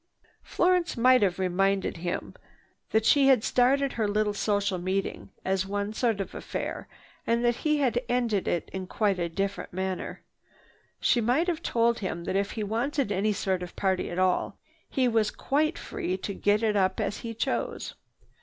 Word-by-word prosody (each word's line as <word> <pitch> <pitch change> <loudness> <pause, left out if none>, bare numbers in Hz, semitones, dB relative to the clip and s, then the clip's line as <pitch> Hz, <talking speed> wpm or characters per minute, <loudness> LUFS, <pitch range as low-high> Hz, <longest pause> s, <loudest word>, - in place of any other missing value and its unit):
Florence 360 -4 +1
might 255 +2 +5
have 190 -3 +2
reminded 190 +1 +1
him 175 +1 -4 0.6
that 220 0 +2
she 275 +4 +5
had 260 -5 +5
started 270 +2 +2
her 220 -2 0
little 210 0 +1
social 200 -2 0
meeting 190 +3 -2 0.2
as 190 0 0
one 205 +1 -2
sort 225 -2 0
of 195 - -4
affair - - -5 0.4
and 235 +1 +2
that 240 0 +2
he 305 -1 +1
had 250 -4 +1
ended 235 -5 +1
it 170 - -1
in 190 -1 -4
quite 200 -2 0
a 170 -1 -1
different 195 +4 -3
manner. 190 0 -4 0.8
She 240 - +3
might 250 +9 +2
have 335 -2 -1
told 235 -3 +1
him 170 -4 -4
that 190 - -3
if 200 +1 0
he 220 - -3
wanted 235 +4 -1
any 205 +2 +1
sort 190 -2 -1
of 180 -1 -7
party 190 -2 0
at 175 - -5
all, 185 0 +1 0.3
he 260 -2 +1
was 225 -3 +2
quite 305 +4 0
free 185 +1 -3
to 200 +1 -4
get 205 +3 +1
it 215 -2 +2
up 190 -2 +2
as - - -1
he 230 -1 -6
chose. 230 - -2
210 Hz, 180 wpm, -27 LUFS, 190-245 Hz, 0.8 s, might